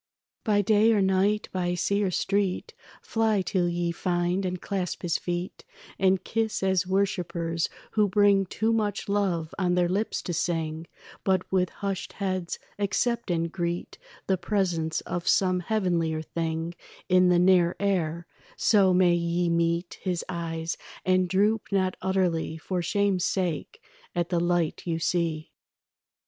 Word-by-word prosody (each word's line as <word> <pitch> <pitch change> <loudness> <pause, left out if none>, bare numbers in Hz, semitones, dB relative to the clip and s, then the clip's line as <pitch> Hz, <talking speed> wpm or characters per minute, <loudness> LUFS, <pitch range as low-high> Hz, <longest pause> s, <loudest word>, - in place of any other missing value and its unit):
By 205 -2 +2
day 215 +2 +4
or 210 - +3
night, 190 +3 +2
by 180 -1 -1
sea 200 +3 +1
or 195 - +1
street, 195 +1 -1 0.3
Fly 220 -3 +1
till 180 -2 0
ye 175 0 -1
find 175 +2 0
and 180 0 -3
clasp 190 -2 -3
his 170 -2 0
feet 175 +1 -4 0.4
And 190 -1 +3
kiss 225 -3 -1
as 190 -1 +2
worshippers 175 -4 -1 0.2
who 210 -2 +2
bring 200 -1 +4
Too 220 +4 0
much 210 -3 -1
love 190 -6 0
on 180 -2 +2
their 180 -1 +3
lips 200 +5 -1
to 175 - -3
sing, 160 -1 -2 0.4
But 190 -1 0
with 185 -2 +2
hushed 195 -2 -4
heads 185 -3 -2 0.2
accept 235 +3 0
and 170 -1 0
greet 175 - -3 0.3
The 190 -2 +1
presence 175 -5 0
of 175 0 -4
some 185 -1 +3
heavenlier 170 -5 0
thing 165 +1 -3 0.3
In 185 0 +5
the 180 - +4
near 180 -1 +4
air; 170 -4 0 0.3
so 195 -4 +4
may 180 -1 +5
ye 170 0 0
meet 170 +1 0
His 180 -3 -2
eyes, 165 -2 -3 0.3
and 185 -1 +3
droop 205 +4 +2
not 190 -2 +1
utterly 180 -4 0
For 180 +2 -3
shame's 195 +1 +1
sake 185 - -2 0.4
at 175 -1 0
the 175 - +1
light 175 -2 0
you 165 -1 0
see. 165 -2 -1
180 Hz, 150 wpm, -27 LUFS, 170-195 Hz, 0.4 s, In